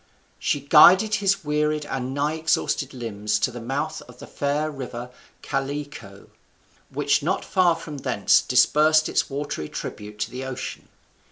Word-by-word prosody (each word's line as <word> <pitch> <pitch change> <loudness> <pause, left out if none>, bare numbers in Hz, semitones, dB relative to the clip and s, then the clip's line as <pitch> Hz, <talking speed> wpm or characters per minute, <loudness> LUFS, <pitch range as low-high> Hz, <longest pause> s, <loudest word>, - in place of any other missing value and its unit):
She 145 - -1
guided 180 +9 +6
his 195 -2 +1
wearied 150 0 0
and 130 -2 -4
nigh 145 +3 -1
exhausted 160 -3 -1
limbs 105 -4 -2
to 105 - 0
the 120 0 -8
mouth 135 +4 -3
of 125 0 -15
the - - -10
fair 145 +2 -2
river 125 -3 -7 0.3
Callicoe, 135 -8 -5 0.6
which - - +1
not - - -1
far 180 -3 +3
from 155 -3 -8
thence 125 -7 +3
disbursed 155 +5 +4
its - - 0
watery 140 - -4
tribute 105 0 -7
to 115 - -2
the 130 +2 -6
ocean. 130 -1 -6
140 Hz, 150 wpm, -24 LUFS, 125-150 Hz, 0.6 s, guided